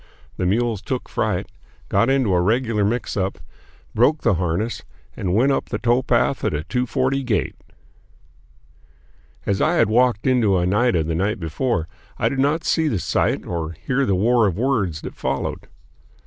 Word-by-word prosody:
The 90 - 0
mules 110 +1 0
took 130 +2 -4
fright, - - -1 0.4
got 115 - +2
into 130 -7 +2
a 90 - +3
regular 110 +2 +1
mixup, 100 -3 -1 0.6
broke 145 +7 +3
the - - +3
harness, 90 +6 -1 0.3
and 90 -1 -1
went 130 +6 +3
up - - -1
the - - -2
towpath 120 +2 +1
at 105 -7 0
a 75 - -3
two 125 +7 -2
forty 135 +3 0
gait. 115 -8 -1 1.9
As 100 -1 0
I 175 - +2
had 160 - +3
walked 120 -1 +2
into 120 -7 +3
Oneida 90 0 +2
the 80 +1 -2
night 100 +6 -1
before, 85 - -1 0.3
I - - +1
did 135 - -3
not 150 +4 +1
see 160 -2 +1
the 115 - 0
sight - - 0
or 85 -2 -4
hear 130 - -1
the 95 - +2
war 115 +3 +3
of 95 - -2
words 110 - 0
that - - -7
followed. 70 - -3
110 Hz, 165 wpm, -21 LUFS, 95-125 Hz, 1.9 s, a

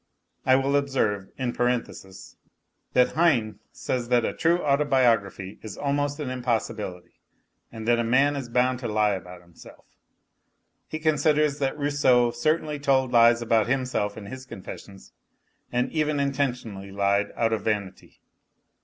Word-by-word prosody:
I 130 - +6
will 135 +1 +1
observe, 125 -9 0
in 125 -2 -2
parenthesis, 115 -6 -3 0.6
that 125 0 +4
Heine 120 -11 +1
says 120 -2 -3
that 120 -2 +3
a - - -2
true 170 +1 +2
auto 140 0 +2
biography 115 -8 +1
is 105 -3 -8
almost 145 +1 -1
an 140 -4 -3
impossibility, 110 -7 -3 0.5
and 110 -1 -8
that 120 0 +3
man 135 +5 +3
is 135 -4 -5
bound 125 +1 +1
to 125 - -4
lie 105 -1 +2
about 90 -2 -8
himself. 85 -1 -16 1.0
He 155 - -5
considers 150 -1 +2
that 135 +1 -1
Rousseau 135 -5 +3
certainly 150 +4 -1
told 135 -2 +2
lies 120 0 +5
about 110 -2 +2
himself 125 -6 -1
in 105 - -8
his 130 +5 -9
confessions, 95 -1 -11 0.6
and 125 0 0
even 150 -2 0
intentionally 125 -8 -2
lied, 100 +1 +1
out 115 -1 +1
of 110 - -1
vanity. 100 -3 -4
125 Hz, 145 wpm, -25 LUFS, 105-140 Hz, 1.0 s, I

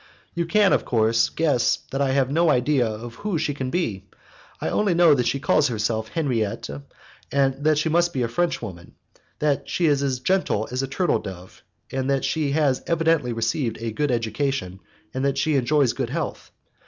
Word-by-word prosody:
You 170 -1 -2
can, 205 +1 +4
of - - +2
course, 115 0 +2
guess 150 -7 +2 0.2
that 135 - -1
I 140 - +2
have 135 -1 +1
no 165 +2 +3
idea 125 -1 +2
of 110 +2 -6
who 205 -5 -2
she 155 -1 -1
can 135 -2 -4
be. 110 - -2 0.5
I - - -3
only 200 -4 +1
know 170 -3 +6
that 125 -4 +1
she 125 +3 0
calls 145 - +3
herself 110 -1 -1
Henriette, 120 -9 -2 0.6
that 140 +2 +2
she 155 - +1
must 170 +2 +2
be 130 -7 -1
a - - 0
Frenchwoman, 115 - -3 0.4
that 150 -2 0
she 175 - 0
is 145 -3 +3
as 135 -3 -1
gentle 185 - 0
as 130 +1 -1
a 135 - -2
turtledove, 100 - -3 0.3
that 135 +1 0
she 155 -3 0
has 145 -4 +2
evidently 165 -6 +1
received 115 +1 -1
a 115 0 -3
good 145 +6 -1
education, 115 -4 -2 0.3
and 130 - -2
that 140 0 0
she 155 +2 +1
enjoys 135 0 +2
good 125 -2 -3
health. 155 +3 -4
135 Hz, 180 wpm, -23 LUFS, 115-155 Hz, 0.6 s, know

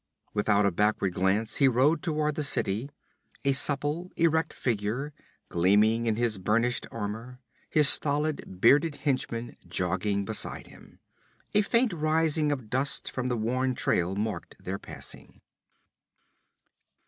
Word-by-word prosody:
Without 105 -1 +2
a 100 - +3
backward 105 0 0
glance 100 +5 0
he 140 - +5
rode 135 +6 +3
toward 155 -3 -1
the 155 - -3
city, 115 -2 0 0.6
a 140 - +4
supple, 145 +6 +1
erect 160 -1 +1
figure, 120 +5 -2 0.3
gleaming 105 +6 +2
in 110 - +1
his 115 -3 -1
burnished 115 +6 0
armor, 115 +4 -6 0.3
his 150 -2 +5
stolid, 145 -10 +2
bearded 145 - +4
henchmen 130 -4 -2
jogging 95 +3 -1
beside 110 +1 -3
him. - - -17 0.6
A 210 - +4
faint 230 +1 +1
rising 155 -1 +1
of 130 -6 -4
dust 135 +2 0
from 125 -1 -3
the 125 -1 -1
worn 130 +3 -1
trail 90 -2 0
marked 105 +1 -4
their 95 +2 -5
passing. - - -9
125 Hz, 130 wpm, -27 LUFS, 105-150 Hz, 0.6 s, he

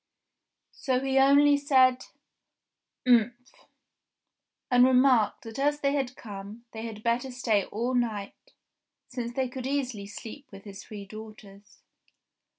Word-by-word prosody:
So 260 -3 -1
he 270 0 +1
only 285 +1 +5
said, 260 -3 +3 1.0
"Umph!" 245 +1 +1 1.0
and 245 0 +6
remarked 255 -3 +3
that 225 +3 -8
as 290 +1 +1
they 275 0 +1
had 265 -3 -2
come, 205 +2 -10
they 220 - -7
had 215 -1 -9
better 240 +3 0
stay 230 -5 0
all 235 +4 -3
night, 220 -5 -3 0.6
since 245 -2 -5
they 260 +1 -1
could 255 0 -6
easily 255 -7 -3
sleep 235 +7 -10
with 195 -1 -12
his 200 -2 -10
three 205 -2 -9
daughters. 210 -1 -13
245 Hz, 130 wpm, -27 LUFS, 215-265 Hz, 1.0 s, and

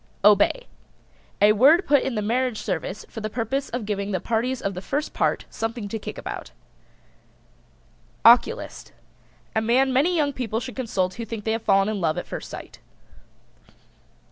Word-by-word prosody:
OBEY. 210 - +4 0.8
A 210 - +7
word 280 - +5
put 285 -2 +4
in 265 -3 -2
the 210 - -1
marriage 245 +1 0
service 200 0 -4
for 225 - -8
the 215 - -3
purpose 250 +5 -2
of 240 -2 -4
giving 200 -1 -2
the 190 -2 -1
parties 235 +6 -1
of 200 - -2
the 180 - -6
first 290 +9 -3
part - - 0
something 225 -1 -4
to 225 - -4
kick - - -7
about. - - -6 1.8
OCULIST. 235 +2 +4 0.6
A 220 - +2
man 255 +4 +2
many 310 +8 +3
young 290 -3 +1
people 225 -4 -2
should 245 +1 -7
consult 190 -8 -1
who 235 - -6
think 225 -1 -6
they 220 - -1
have 225 +1 -1
fallen 195 -1 +3
in 215 -2 -2
love 160 -2 0
at - - -3
first - - -7
sight. - - -9
225 Hz, 170 wpm, -24 LUFS, 205-260 Hz, 1.8 s, A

